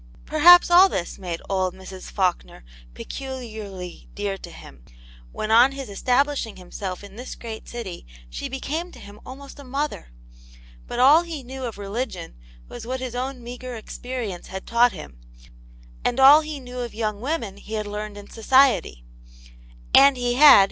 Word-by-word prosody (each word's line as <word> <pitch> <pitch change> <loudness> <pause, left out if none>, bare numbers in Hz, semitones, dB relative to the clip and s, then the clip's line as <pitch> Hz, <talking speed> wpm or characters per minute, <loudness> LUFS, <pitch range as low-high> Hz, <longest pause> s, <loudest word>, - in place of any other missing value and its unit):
Perhaps, 350 +4 +7
all 365 +3 +8
this 175 - -4
made 175 -3 -5
old 185 -2 -1
Mrs. 190 0 -10
Faulkner 180 - -2 0.3
peculiarly 220 - -8
dear 205 -1 -2
to 185 - -11
him, 65 - -14 0.5
when 215 - -4
on 245 +4 +6
his 270 -4 -7
establishing 250 +3 0
himself 185 +1 -7
in 200 +1 -12
this 250 +2 -7
great 225 -2 -8
city, 210 - -7 0.2
she - - -6
became 315 +6 -4
to - - -13
him 205 +1 -13
almost 275 +2 -11
a - - -9
mother. 280 - -4 0.8
But - - -5
all 280 +6 +7
he 330 -5 -7
knew 260 +1 -7
of 230 -4 -6
religion 205 - -5 0.3
was 235 -1 -9
what 260 +1 -3
his 255 -2 -5
own 255 0 -4
meagre 245 +1 -7
ex 220 - -9
perience 245 -8 -5
had 190 0 -7
taught 235 +1 +4
him, 155 - -11 0.8
and 245 +2 0
all 280 +3 +9
he 305 -2 -6
knew 250 -1 -8
of 240 -3 -5
young 215 -2 -3
women 240 -8 -3
he 210 +2 -11
had 215 -1 -2
learned 210 0 -6
in 205 0 -11
society. 225 - +2 0.9
And 275 -1 +7
he 245 -1 0
had^?. 255 - -2
240 Hz, 170 wpm, -23 LUFS, 200-265 Hz, 0.9 s, all